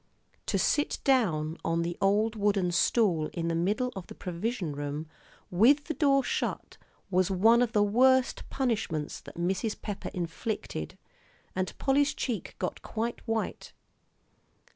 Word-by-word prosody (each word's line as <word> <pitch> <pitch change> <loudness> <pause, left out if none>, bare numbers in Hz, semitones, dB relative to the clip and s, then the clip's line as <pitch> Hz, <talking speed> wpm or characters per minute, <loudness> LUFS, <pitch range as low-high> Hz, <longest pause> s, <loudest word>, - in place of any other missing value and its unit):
To - - +1
sit 295 - +1
down 170 - +2
on 165 0 0
the 170 0 -3
old 210 +3 +2
wooden 200 -4 +1
stool 170 -3 +2
in 170 -1 -2
the - - 0
middle 210 +9 0
of 190 -2 -7
the - - -10
provision 180 -1 -3
room, 145 +2 -4 0.5
with 245 +11 +5
the 315 - -3
door 275 -3 +3
shut, - - -3 0.3
was 185 0 +3
one 220 +6 +5
of 240 -2 +1
the 210 - +4
worst 255 +5 +3
punishments 205 - -1
that - - -12
Mrs. 190 +5 -1
Pepper 205 -2 -5
inflicted; 165 - -4 0.6
and 185 0 -2
Polly's 280 +1 +2
cheek 240 -5 -3
got - - -3
quite 230 +1 -3
white. 225 -1 -3
205 Hz, 140 wpm, -29 LUFS, 170-240 Hz, 0.6 s, with